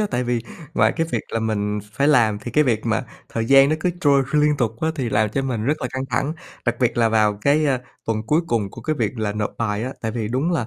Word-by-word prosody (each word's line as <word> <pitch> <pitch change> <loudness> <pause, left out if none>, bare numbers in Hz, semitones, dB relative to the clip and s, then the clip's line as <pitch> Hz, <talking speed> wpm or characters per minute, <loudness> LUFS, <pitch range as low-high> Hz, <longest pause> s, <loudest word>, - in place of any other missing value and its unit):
á, 210 - +2
tại 125 +1 0
vì 120 -1 -1 0.3
ngoài - - +4
cái 165 -1 +1
việc - - 0
là 115 - -1
mình 105 -1 -1
phải 140 +4 +2
làm 110 -7 +4
thì 120 - -7
cái 150 +3 +3
việc 115 -2 0
mà 115 +3 0 0.2
thời 115 - -2
gian 135 +1 +7
nó 155 - +1
cứ 180 - +1
trôi 140 -2 +4
liên 150 0 +3
tục 115 -4 0
á, 160 - +1
thì 130 -6 -2
làm 105 0 +2
cho 135 +6 -2
mình 120 -5 -2
rất 150 +2 0
là 125 - -1
căng 130 0 -2
thẳng. 135 +6 0 0.3
Đặc 120 -1 0
biệt 120 -1 +2
là 115 -1 +4
vào 105 -2 +2
cái, 150 +2 +3
ơ, 130 -3 +2 0.3
tuần 110 -1 0
cuối 155 +5 +3
cùng 105 -7 -1
của - - -10
cái 155 -1 -1
việc 130 - -2
là 105 -2 -1
nộp 105 0 -2
bài 105 -1 -1
á, 130 - -4
tại 110 - -2
vì 110 -2 -3
đúng 135 +8 0
là 120 -9 0
120 Hz, 280 wpm, -22 LUFS, 110-140 Hz, 0.3 s, gian